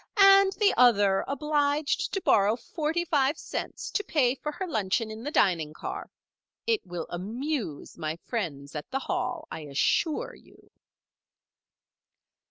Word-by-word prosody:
"And 390 0 +7
the 410 +1 +3
other 205 -6 +5
obliged 290 +1 0
to 390 - -1
borrow 205 - +4
forty 315 +7 -2
five 290 -2 +2
cents - - -5
to 415 - 0
pay 270 -10 +2
for 300 +3 -5
her 380 +5 -4
luncheon 220 - -1
in 220 +1 -8
the 280 - -3
dining 170 - +2
car. - - -6 0.6
It 455 -2 +1
will 175 -2 -5
amuse 215 - -4
my 155 -1 -2
friends 165 - -5
at 150 - -6
the 265 - -1
Hall, 250 -2 -3
I - - -5
assure 150 - 0
you." - - -20
250 Hz, 140 wpm, -28 LUFS, 190-305 Hz, 0.6 s, And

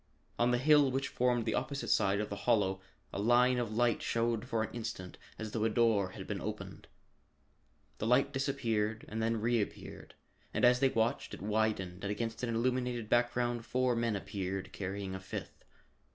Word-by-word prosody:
On 120 +1 +4
the 125 - +3
hill 145 +1 +5
which 135 +2 -1
formed 120 -2 +1
the 110 - 0
opposite 140 -2 -2
side 100 -1 +3
of 105 - -3
the - - -2
hollow 95 -4 +2 0.3
a - - -3
line 125 +3 +4
of 120 -3 -2
light 120 +1 +2
showed 115 0 0
for 115 -4 0
an - - -6
instant 110 -6 -6 0.2
as 110 -1 -5
though 110 -1 -1
a 110 - +3
door 110 -4 +2
had - - -7
been - - -4
opened. - - -6 1.1
The 110 - -1
light 125 +3 +3
disappeared 115 -6 -1
and 110 +1 -4
then 115 0 +1
reappeared, 115 -1 -2 0.4
and - - +4
as 125 0 +5
they 135 0 +4
watched 115 -1 0
it - - -13
widened 105 -4 -1
and 100 - -2
against 115 +2 -3
an 125 - -1
illuminated 120 -1 -1
background 120 0 +1
four 125 0 +1
men 115 -2 0
appeared, 95 -1 -4
carrying 95 0 -4
a 95 - -4
fifth. 95 0 -7
115 Hz, 180 wpm, -33 LUFS, 105-125 Hz, 1.1 s, hill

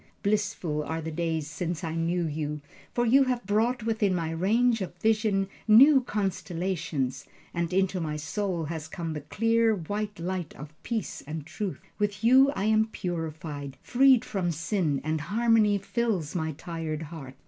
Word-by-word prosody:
Blissful 200 -7 0
are 160 +2 -3
the 160 0 -5
days 160 -1 -1
since 165 +3 -4
I 160 -1 -2
knew 170 +1 0
you, 150 -1 -3 0.3
for 240 - +1
you 270 +4 +5
have 250 -3 -1
brought 225 +4 +1
within 220 -4 +1
my 165 -2 -2
range 225 +7 +2
of 180 -2 -4
vision 215 -1 +1 0.2
new 265 +6 +8
constellations, 175 - -2 0.3
and 170 -1 -1
into 190 0 +1
my 155 -2 -2
soul 170 +3 -2
has 160 0 -5
come 165 -1 -4
the 150 - -5
clear, 225 +7 +2
white 205 +3 -4
light 180 -1 -4
of 150 +2 -10
peace 230 -3 -3
and 155 -1 -5
truth. 195 +3 -4 0.2
With 205 0 -1
you 260 +4 +7
I 195 - -2
am 220 +1 +3
purified, 155 -7 -5
freed 255 -1 +5
from 185 -6 -1
sin, 165 -2 -1
and 155 0 -1
harmony 215 +2 +3
fills 200 -6 -1
my 160 -3 -2
tired 160 -1 -5
heart. 145 -5 -9
180 Hz, 160 wpm, -28 LUFS, 160-215 Hz, 0.3 s, new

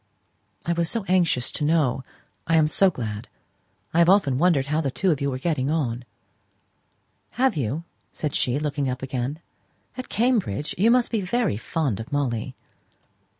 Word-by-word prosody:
"I 170 - +1
was 170 -1 0
so 230 -3 -1
anxious 170 -9 +2
to - - -3
know. 145 -5 +2 0.4
I 165 - +3
am 155 -1 +5
so 190 +5 +4
glad. 110 - -5 0.7
I 165 - +3
have 170 0 +6
often 145 -10 +4
wondered 165 -5 +3
how 150 +3 0
you 140 - -1
two 140 -2 0
were 130 - -3
getting 135 -2 -1
on." 125 -6 -1 1.3
"Have 260 -3 +3
you?" 145 +3 -2 0.3
said 150 -3 -3
she, 125 +2 +1
looking 145 -2 -1
up 125 +1 -4
again. 135 +4 -3 0.5
"At 255 - -7
Cambridge? 210 - 0
You 210 +6 +3
must 245 0 +3
be 225 -3 0
very 220 - 0
fond 130 0 -2
of 115 +7 -7
Molly!" 130 -3 -1
150 Hz, 160 wpm, -24 LUFS, 130-175 Hz, 1.3 s, have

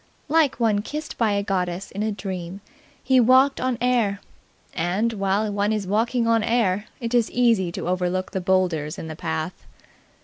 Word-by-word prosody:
Like 305 -4 +2
one 215 -3 +2
kissed 300 +7 -6
by 220 -3 +2
a 200 0 0
goddess 185 -1 -2
in 200 - -5
a 215 0 0
dream, 190 -2 -6 0.4
he 260 -1 +4
walked 260 +3 +4
on 255 -1 0
air; 235 -5 +1 0.5
and, 195 +8 0
while 200 +1 0
one 205 +1 0
is 210 -2 -1
walking 230 +5 +1
on 230 -1 +3
air, 215 -3 +1
it 235 -1 -4
is 235 -3 +3
easy 230 -8 +2
to - - -4
overlook 185 +1 -1
the 190 - -2
boulders 180 -5 0
in - - -6
the 155 - -6
path. 80 - -4
205 Hz, 175 wpm, -23 LUFS, 185-235 Hz, 0.5 s, he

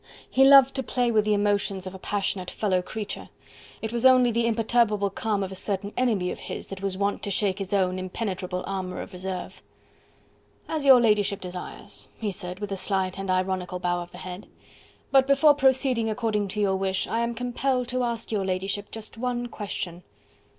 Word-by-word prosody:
He 265 - +4
loved 270 -1 +8
to - - +1
play 245 0 0
with 215 -2 +3
the 210 -1 +3
emotions 200 -2 0
of 185 - -6
a 190 - -9
passionate 190 -2 -2
fellow 190 -4 0
creature: 210 +3 -6 0.5
it 220 +1 -3
was 235 0 -1
only 255 -2 +6
the 230 +1 +1
imperturbable 220 -3 +2
calm 205 0 -1
of 190 - -5
a - - -5
certain 200 +1 -3
enemy 215 -8 +1
of - - -6
his - - -7
that 195 -1 -7
was 195 -1 -2
wont 200 +1 0
to - - -4
shake 200 0 0
his 195 -1 -5
own 185 -2 +1
impenetrable 185 -1 -3
armour 185 -2 -4
of - - -13
reserve. 185 0 -5 1.1
"As 310 -3 -2
your 265 -2 +9
ladyship 210 -3 +2
desires," 180 0 -8
he 215 -3 -2
said, 180 -2 -7
with 205 -1 -5
a 195 - -2
slight 190 -1 -1
and 195 -1 -4
ironical 185 -1 0
bow 175 -1 -1
of 175 0 -9
the - - -11
head. 185 +2 -8 0.6
"But 270 -1 +5
before 280 +2 +6
proceeding 265 -4 +2
according 215 -2 0
to 210 +2 -5
your 195 -2 +2
wish, 190 0 0
I 230 - -1
am 235 0 -1
compelled 250 +1 -1
to 255 0 -1
ask 235 -2 -3
your 205 -3 0
ladyship 190 +2 -2
just 225 0 -9
one 245 -1 -2
question." 185 -5 -5
205 Hz, 195 wpm, -26 LUFS, 190-235 Hz, 1.1 s, your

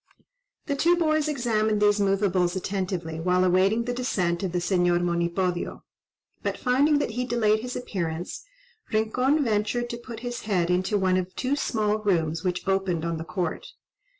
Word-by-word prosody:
The 285 - -1
two 340 +5 +3
boys 310 -2 +2
examined 220 -7 +1
these 205 0 +3
moveables 195 -3 +1
attentively 185 -4 -3
while 180 +2 +2
awaiting 190 +5 +3
the 245 +1 -2
descent 185 -9 -1
of 190 -3 -2
the 180 - -1
Señor 175 -1 +2
Monipodio, 175 +1 -1 0.6
but - - -2
finding 285 +4 +3
that 285 - -1
he 245 +3 -2
delayed 225 -3 +2
his 250 +2 -5
appearance, 175 -7 -4 0.5
Rincon 250 +7 +2
ventured 230 +2 0
to 235 - -4
put 235 -2 -9
his 245 0 -4
head 180 -3 +2
into 185 +3 +1
one 185 -1 +2
of 185 0 -3
two 265 +2 0
small 215 -6 0
rooms 165 -5 0
which 180 0 -2
opened 190 -4 0
on 170 -1 -1
the 160 - -5
court. 180 -1 -3
195 Hz, 165 wpm, -26 LUFS, 180-240 Hz, 0.6 s, two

